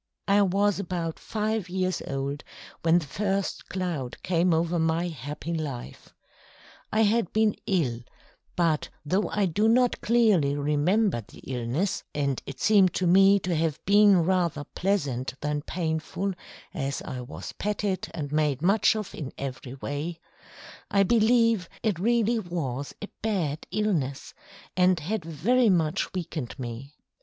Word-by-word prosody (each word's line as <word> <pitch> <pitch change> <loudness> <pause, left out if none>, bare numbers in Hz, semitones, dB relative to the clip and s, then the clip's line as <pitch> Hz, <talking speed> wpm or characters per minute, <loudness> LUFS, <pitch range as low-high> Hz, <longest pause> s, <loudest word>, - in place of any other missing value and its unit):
I 200 +1 +5
was 200 +1 +2
about 170 -4 -3
five 215 -3 -2
years 185 -1 -1
old 140 +2 -3 0.4
when 165 +1 +4
the 170 - -1
first 195 +5 -2
cloud 170 -9 -3
came 180 0 +2
over 165 +1 +1
my 165 +2 +1
happy 150 +3 -5
life. 145 -7 -6 0.8
I 220 - +2
had 220 -2 +2
been 220 -1 +3
ill, 145 - +1 0.6
but 165 -3 +1 0.2
though 185 +8 +1
I 205 -1 +1
do 205 +5 +1
not 245 +1 +3
clearly 210 -12 +3
remember 150 - +1
the 100 - -16
illness 130 +9 -2
and 140 -3 0
it 135 -2 -7
seemed 200 -4 +4
to 185 - 0
me 195 +3 +6
to 180 -2 -1
have 155 -2 0
been 200 -3 +6
rather 170 -4 +1
pleasant 140 -9 -1
than 150 0 -1
painful, 165 +4 -2 0.4
as 140 -5 -3
I 125 - -5
was 125 +3 -7
petted 205 -2 -2
and 145 -4 -5
made 150 -2 +1
much 205 +4 +4
of 215 -3 -4
in 140 -4 -6
every 130 -1 -6
way 145 +5 -4 0.7
I 200 -1 +4
believe 230 -2 +3
it 205 -7 0
really 230 +2 +2
was 145 - -4
a 205 - -6
bad 175 -9 -1
illness, 180 -10 -1 0.4
and 180 -1 +4
had 190 +5 -3
very 210 - +2
much 170 0 +1
weakened 160 -9 -5
me. 130 +3 -7
175 Hz, 145 wpm, -27 LUFS, 145-200 Hz, 0.8 s, me